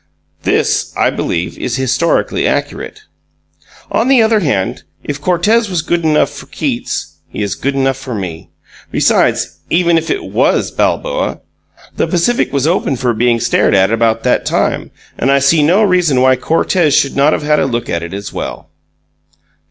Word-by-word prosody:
This, - - 0
I - - +2
believe, 85 +2 -3
is 120 - -2
historically 130 +5 0
accurate. 425 - -3 0.9
On 230 - +1
the 260 -4 +5
other 220 -1 +3
hand, 135 - -1 0.2
if 145 0 -5
Cortez 205 +7 +2
was 175 -4 -1
good 175 0 -1
enough 155 -1 +2
for - - -11
Keats, - - -4
he - - -4
is 100 -3 -2
good 135 +10 -2
enough 135 -1 +1
for 135 -3 -6
me. 90 -5 -6 0.4
Besides, - - +1
even 170 -1 +3
if 160 - -8
it 395 - -1
was - - +1
Balboa, - - -1 0.6
the - - +1
Pacific 190 +7 +1
was 140 -1 0
open 165 -4 +1
for 125 -1 0
being 120 +1 +1
stared 110 - +2
at 95 +1 +3
about 115 0 +1
that - - +1
time, - - -1 0.3
and 135 - +2
I 140 - +4
see 140 +3 +3
no 180 +9 +3
reason 180 -9 +2
why 130 0 +5
Cortez 160 +4 +1
should 140 - +1
not 140 +2 +3
have - - -2
had 150 0 +2
a - - +1
look 120 -2 -3
at 85 - -2
it 85 0 -7
as 100 0 -7
well. - - -6
140 Hz, 175 wpm, -14 LUFS, 120-175 Hz, 0.9 s, the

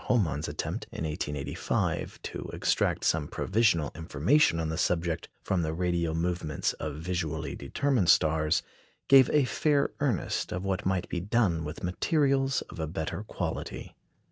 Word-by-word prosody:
Homann's 80 - +1
attempt, - - -4
in - - -5
1885, 75 -3 -2
to - - -6
extract - - +1
some 80 -3 +1
provisional 95 -8 +1
information 85 - +2
on 80 -1 -1
the 80 - -2
subject 85 -2 0
from 95 -2 0
the 80 -1 -2
radial 85 -2 0
movements 85 -3 -1
of 75 -2 -4
visually 80 -1 -3
determined 135 -11 0
stars 80 +1 +3 0.4
gave 135 -2 +7
a 150 -3 +4
fair 145 +2 +1
earnest 130 -10 -1
of 90 - -3
what 95 -1 -1
might 95 -2 0
be 90 - -2
done 95 -4 +1
with 75 +2 -7
materials 135 - +1
of - - -11
a 80 - -1
better 80 +4 -3
quality. 105 - -5
85 Hz, 145 wpm, -29 LUFS, 80-110 Hz, 0.4 s, gave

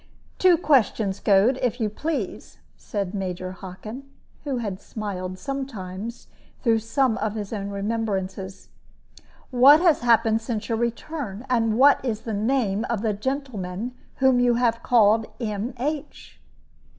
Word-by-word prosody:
"Two 365 -2 +6
questions, 225 -9 +2
Goad, 210 +6 +3
if 245 0 0
you 220 - +1
please," 255 - -4 0.2
said 200 -3 -4
Major 185 -2 -4
Hockin, 200 +8 -9 0.4
who 275 -3 -1
had 205 -5 -4
smiled 185 -4 -5
sometimes, 230 -4 -6 0.4
through 230 -3 +3
some 225 +2 +1
of 215 0 -2
his 210 0 -5
own 200 -2 -3
remembrances; 195 -2 -3 0.8
"what 265 +4 +8
has 340 -4 +4
happened 225 -2 +3
since 225 -1 -4
your 225 - +1
return, 235 -1 -4
and 225 -3 +2
what 275 +1 +6
is 225 -4 -2
the 225 - -5
name 215 -1 0
of 235 -3 -1
the 220 -2 +1
gentleman 220 -3 -4 0.2
whom 265 -2 +3
you 245 -1 +3
have 235 -1 +1
called 220 -2 +4
'M.H.?'" 250 +7 -4
225 Hz, 135 wpm, -24 LUFS, 200-255 Hz, 0.8 s, what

